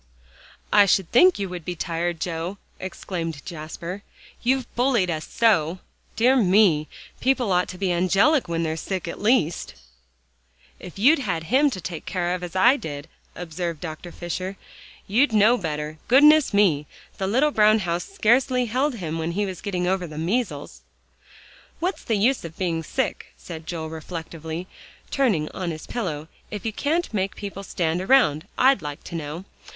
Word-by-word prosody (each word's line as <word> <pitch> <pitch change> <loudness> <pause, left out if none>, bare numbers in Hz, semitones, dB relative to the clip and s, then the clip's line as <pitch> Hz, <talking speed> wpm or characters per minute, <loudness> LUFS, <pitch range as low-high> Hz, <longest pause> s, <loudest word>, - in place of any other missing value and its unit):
"I 205 -1 +7
should 190 -2 +2
think 360 +9 +6
you 200 - -2
would 180 -2 -6
be 175 +2 -4
tired, 170 0 -2
Joe," 170 +3 -3 0.2
exclaimed 165 -5 -5
Jasper, 170 +4 -6 0.4
"you've 260 +1 +1
bullied 240 -8 +2
us 155 -1 -4
so. 185 -7 +2 0.4
Dear 245 +4 +4
me! 185 -8 +4 0.3
people 255 -5 +1
ought 180 0 +2
to 185 - -8
be 190 -1 0
angelic 195 - +3
when 170 0 -1
they're 160 -1 -1
sick, 185 +1 -4
at 170 - -6
least." 210 -7 +1 1.0
"If 180 0 -10
you'd 280 +10 +5
had 175 -10 -2
him 290 +2 +5
to 195 - -5
take 170 -2 -7
care 175 -1 -1
of 180 - -3
as 180 0 -7
I 240 +9 +5
did," 145 - -7 0.3
observed 170 -1 -4
Dr. 165 +1 -7
Fisher, 185 +3 -5 0.5
"you'd 235 +5 +2
know 215 +3 +5
better; 155 -5 -4
goodness 295 +4 +6
me! 175 -9 +3 0.3
the 190 - -1
little 265 +9 +3
brown 215 -3 +5
house 175 -4 -2
scarcely 250 - +2
held 255 +4 0
him 165 -6 -4
when 165 +1 -2
he 205 +3 0
was 185 -3 -6
getting 185 -3 -2
over 185 -1 0
the 155 -1 -9
measles." 205 +10 -2 1.0
"What's 360 +4 -2
the 225 - 0
use 245 +6 +2
of 165 -1 -9
being 170 -3 -1
sick," 260 +9 -3
said 160 -2 -9
Joel 160 -2 -4
reflectively, 160 +1 -6 0.5
turning 210 - +1
on 185 -2 -4
his 155 -2 -6
pillow, 160 -10 -4 0.2
"if 210 -1 -6
you 220 - -2
can't 315 +4 -1
make 195 -1 -1
people 200 -1 -6
stand 175 -3 -1
around, 190 - +3
I'd 265 -3 +4
like 145 -1 -6
to - - -10
know. 160 +3 -5
185 Hz, 165 wpm, -24 LUFS, 165-230 Hz, 1.0 s, I